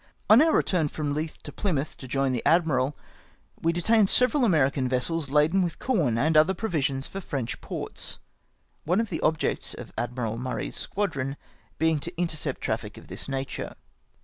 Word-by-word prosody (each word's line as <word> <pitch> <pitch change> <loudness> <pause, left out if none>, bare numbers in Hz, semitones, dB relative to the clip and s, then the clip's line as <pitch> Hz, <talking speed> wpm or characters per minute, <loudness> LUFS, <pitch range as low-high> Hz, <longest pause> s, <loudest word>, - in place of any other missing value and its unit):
On 225 +5 +9
our 320 +1 +5
return 175 - +2
from 145 -1 -3
Leith 155 +2 -4
to - - -6
Plymouth 155 -8 -2
to 130 - -9
join 135 +1 +1
the 125 -3 -1
admiral, 150 -5 +2 0.6
we 165 - +3
detained 200 +4 +3
several 250 +2 +3
American 140 - +3
vessels 140 +4 +1
laden 150 +6 +3
with 175 -2 -1
corn 165 - +1
and 155 +6 +2
other 155 +5 +5
provisions 140 -10 -1
for 195 - -6
French 130 -9 -4
ports; - - -5 0.7
one 180 +6 +2
of 225 -2 0
the 160 - -2
objects 160 -1 0
of - - -10
Admiral 120 -2 -2
Murray's 125 0 -3
squadron 145 -9 -2 0.4
being 160 -1 +2
to 170 +4 -5
intercept 165 -3 -1
traffic - - -3
of - - -13
this - - -4
nature. 135 0 -4
155 Hz, 170 wpm, -27 LUFS, 135-180 Hz, 0.7 s, On